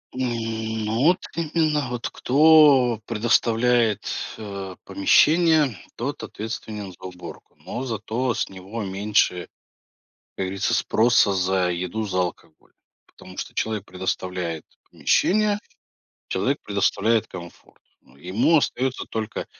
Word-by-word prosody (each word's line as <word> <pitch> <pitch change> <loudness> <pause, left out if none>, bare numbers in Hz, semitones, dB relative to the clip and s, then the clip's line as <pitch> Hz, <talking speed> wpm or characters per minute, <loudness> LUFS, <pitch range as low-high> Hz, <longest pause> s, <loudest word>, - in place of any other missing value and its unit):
М, 110 -3 -2
ну, 110 +3 -1
вот 180 - +5
к - - -19
именно 155 -4 0
вот 120 -1 -3
кто 140 -4 +5
предоставляет, 115 0 +2 0.4
э, 100 -3 -7
помещение, 150 - +4 0.2
тот 135 +4 -4
ответственен 105 -3 -6
за - - -20
уборку. 90 -2 -10
Но 120 +7 -4
зато 120 +1 -2
с - - -2
него 95 +4 -7
меньше, 95 -2 0 0.9
как 95 - -2
говорится, 95 +1 -1
спроса 110 -3 +3
за 95 0 +1
еду, 90 +5 -3
за 95 -1 -1
алкоголь, 85 -3 -6 0.3
потому - - -15
что - - -6
человек 110 -3 -2
предоставляет 90 -3 -4 0.3
помещение, 210 +1 +2 0.7
человек 140 +2 0
предоставляет 105 +2 +1
комфорт. 85 -2 -12 0.2
Ну, - - -24
ему 95 - +2
остается 130 -2 -1
только, 110 -1 -4
110 Hz, 115 wpm, -23 LUFS, 95-125 Hz, 0.9 s, вот